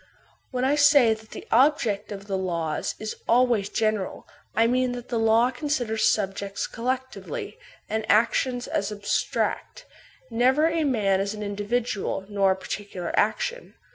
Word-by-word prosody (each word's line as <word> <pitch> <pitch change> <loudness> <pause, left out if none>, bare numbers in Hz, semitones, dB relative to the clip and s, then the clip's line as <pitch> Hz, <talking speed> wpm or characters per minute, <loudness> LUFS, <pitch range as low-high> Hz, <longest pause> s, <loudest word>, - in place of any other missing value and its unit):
When 255 0 -1
I 275 - +3
say 285 -5 +6
that 220 0 -12
the - - -9
object 235 -6 +2
of 200 -1 -7
the 195 -2 -2
laws 170 -5 -2
is 215 0 -5
always 235 -4 +3
gen 215 -1 +1
eral, 190 - -6 0.3
I 225 - +4
mean 250 +1 +1
that 245 -1 -8
the 235 -2 0
law 225 +3 +4
considers 245 -5 -1
subjects 195 -1 -1
collectively, 260 - -4 0.3
and 220 0 -3
actions 245 +3 +2
as 195 +1 -1
abstract, 210 - -2 0.5
never 260 +6 +3
a 325 -1 0
man 205 -8 +2
as 200 +2 -2
an 210 - -6
individual 205 -1 -2
nor 200 -2 +2
a - - -7
particular 190 -2 -5
action. 220 - -1
225 Hz, 150 wpm, -25 LUFS, 205-255 Hz, 0.5 s, say